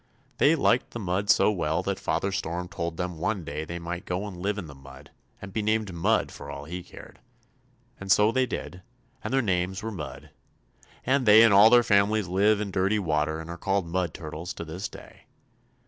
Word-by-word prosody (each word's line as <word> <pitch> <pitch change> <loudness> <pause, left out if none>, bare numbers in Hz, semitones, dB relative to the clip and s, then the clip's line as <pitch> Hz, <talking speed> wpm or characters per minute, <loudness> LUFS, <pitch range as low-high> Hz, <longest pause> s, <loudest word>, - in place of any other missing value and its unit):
They 150 +3 +5
liked 125 -5 +2
the 120 - -7
mud 95 0 -2
so - - +5
well 80 -5 -1
that - - -2
Father 100 - -1
Storm 90 -2 -3
told 85 -3 -5
them 90 -2 -4
one 95 +1 -1
day 75 0 -5
they 85 +2 -6
might 85 +1 -5
go 90 +3 -3
and 100 -3 -7
live 100 +4 -2
in 100 - -5
the 75 - -11
mud 70 +1 -14 0.3
and 100 -1 -10
be 110 - -1
named 110 -2 0
Mud 85 -1 +1
for - - -10
all 70 - -7
he 90 +4 -6
cared; - - -14 0.8
and 95 0 -3
so 105 +3 +5
they 130 +1 +1
did, 90 -1 -6 0.4
and - - -4
their 135 -1 +2
names 95 0 -1
were 110 - -3
Mud, 75 -9 -8 0.7
and 130 -2 +1
they 110 +2 +9
and 115 -3 +5
all 105 +3 +8
their 120 0 +6
families 105 -1 +2
live 100 +4 +2
in 105 -2 -3
dirty 95 +3 +1
water 80 -4 -1
and 80 - -8
are 85 - -8
called 95 0 0
Mud 85 0 -2
Turtles 80 +2 -7
to 85 - -6
this 90 +6 -5
day. - - -14
95 Hz, 210 wpm, -26 LUFS, 85-105 Hz, 0.8 s, they